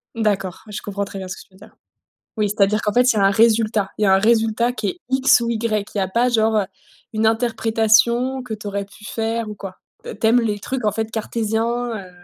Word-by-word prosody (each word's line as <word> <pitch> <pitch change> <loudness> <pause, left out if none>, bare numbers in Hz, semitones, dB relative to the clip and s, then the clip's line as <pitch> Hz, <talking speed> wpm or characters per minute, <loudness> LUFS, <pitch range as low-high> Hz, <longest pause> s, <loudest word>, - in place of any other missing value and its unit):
D'accord, 205 -5 -1
je 210 - -6
comprends 200 0 -4
très 195 0 -8
bien 190 - -6
ce 185 - -5
que - - -11
tu - - -32
veux - - -19
dire. 210 - -17 0.6
Oui, 210 -1 +1
c'est-à-dire 210 +1 +1
qu'en 210 - 0
fait, 250 +3 +4
il - - -5
y - - +2
a - - +2
un 195 - +5
résultat. 220 -1 +2
Il - - -2
y - - +4
a 190 - +4
un - - +4
résultat 225 +2 +2
qui 245 - -3
est 365 - -5
X 265 +1 +4
ou 235 - -2
Y. 220 -3 -1
Il - - -2
y - - +2
a 190 - 0
pas 235 +6 +2
genre, 220 -2 +2
heu, 205 - +1 0.5
une 220 0 +1
interprétation 225 +2 +2
que 245 -3 -5
tu 215 0 -10
aurais 200 0 -3
pu 200 +2 -17
faire 225 +1 -2
ou 210 - -6
quoi. 195 -2 -9 0.3
T 205 - -8
tu 220 - +1
aimes 235 +2 +5
les 215 -3 -1
trucs, 250 +4 -4
en 210 - +3
fait, 220 0 -3
cartésiens, 230 +2 -2
heu 190 -3 -9
220 Hz, 260 wpm, -20 LUFS, 205-235 Hz, 0.6 s, un